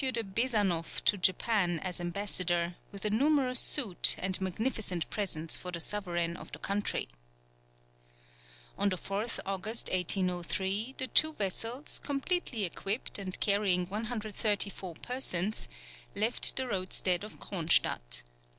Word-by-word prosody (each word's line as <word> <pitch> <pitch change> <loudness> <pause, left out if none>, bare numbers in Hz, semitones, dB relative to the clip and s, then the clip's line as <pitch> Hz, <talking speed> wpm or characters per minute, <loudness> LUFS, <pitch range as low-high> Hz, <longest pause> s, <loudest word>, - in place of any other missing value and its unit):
de 245 -3 -1
Besanoff 200 -5 -1
to - - +4
Japan 185 -1 +1
as 180 -2 -4
ambassador, 175 -1 -1 0.2
with 200 0 -9
a 210 - +2
numerous 260 +1 +3
suite, 225 -12 +5
and 185 0 0
magnificent 190 -2 -1
presents 165 -6 -2
for 180 - -6
the 170 - -5
sovereign 175 -3 -1
of - - -11
the - - -5
country. 205 +1 -2 1.7
On 200 - +2
the 185 - -2
4th 200 +5 -4
August, 195 +4 -2
1803, 190 +5 0
the 260 - 0
two 315 +4 +4
vessels, 225 +5 -1
completely 280 - -2
equipped, 195 +6 -2
and 185 -2 -3
carrying 200 -3 +3
134 210 -3 -1
persons, 215 -6 0 0.5
left 220 +4 +4
the 260 -1 -1
roadstead 185 -3 0
of 210 - -10
Cronstadt. 155 - +1
200 Hz, 125 wpm, -30 LUFS, 180-225 Hz, 1.7 s, suite